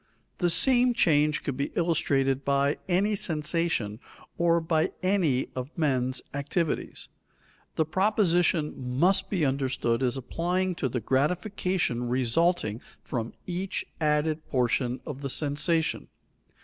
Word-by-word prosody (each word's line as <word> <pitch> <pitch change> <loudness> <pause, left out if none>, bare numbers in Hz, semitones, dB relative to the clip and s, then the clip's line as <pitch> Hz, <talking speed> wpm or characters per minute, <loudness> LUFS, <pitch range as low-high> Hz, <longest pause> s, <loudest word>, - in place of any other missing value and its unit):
The 175 - +2
same 245 +6 +4
change 150 -6 +3
could 140 - -3
be 140 +2 -2
illustrated 140 -5 +1
by 140 +1 +1
any 195 +4 +2
sensation 165 - -1 0.4
or 170 0 +3
by 160 -1 0
any 180 -9 +1
of 130 +1 -4
men's 130 -5 0
activities. 145 +3 -2 0.7
The 160 - +2
proposition 175 -3 +2
must 180 +10 +1
be 180 -7 +1
understood 130 -3 0
as 130 0 +1
applying 180 +8 -1
to 130 - +1
the 125 0 -3
gratification 155 - 0
resulting 125 - +1 0.2
from 115 -2 -4
each 185 +1 -3
added 155 0 +1
portion 125 -1 0
of 140 -2 -6
the 140 - -3
sensation. 155 +4 0
150 Hz, 120 wpm, -27 LUFS, 130-175 Hz, 0.7 s, same